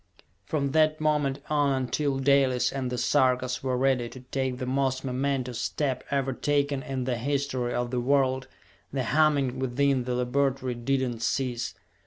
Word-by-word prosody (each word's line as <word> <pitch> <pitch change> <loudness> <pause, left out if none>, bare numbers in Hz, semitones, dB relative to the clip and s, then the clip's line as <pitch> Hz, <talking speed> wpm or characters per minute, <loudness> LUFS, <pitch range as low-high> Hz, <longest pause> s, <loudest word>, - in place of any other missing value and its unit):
From 140 -3 -1
that 155 +1 +3
moment 145 -3 0
on 145 -2 +2
until 140 +2 -1
Dalis 135 -2 +3
and 135 -2 -2
the 125 - -2
Sarkas 130 -2 +2
were 130 -1 -1
ready 130 -2 +1
to 130 - -11
take 130 0 -2
the 125 - -4
most 130 0 0
momentous 130 -2 -1
step 130 -4 -1
ever 135 -1 0
taken 145 0 0
in 130 -1 -3
the 125 -1 -1
history 135 -2 -1
of 120 0 -1
the 125 - 0
world, 130 0 +1 0.4
the 135 -1 -1
humming 140 -2 +2
within 130 0 +1
the 125 -1 -1
laboratory 130 +1 0
did 130 +2 0
not 120 -2 -5
cease. 120 0 -1
130 Hz, 165 wpm, -27 LUFS, 125-140 Hz, 0.4 s, that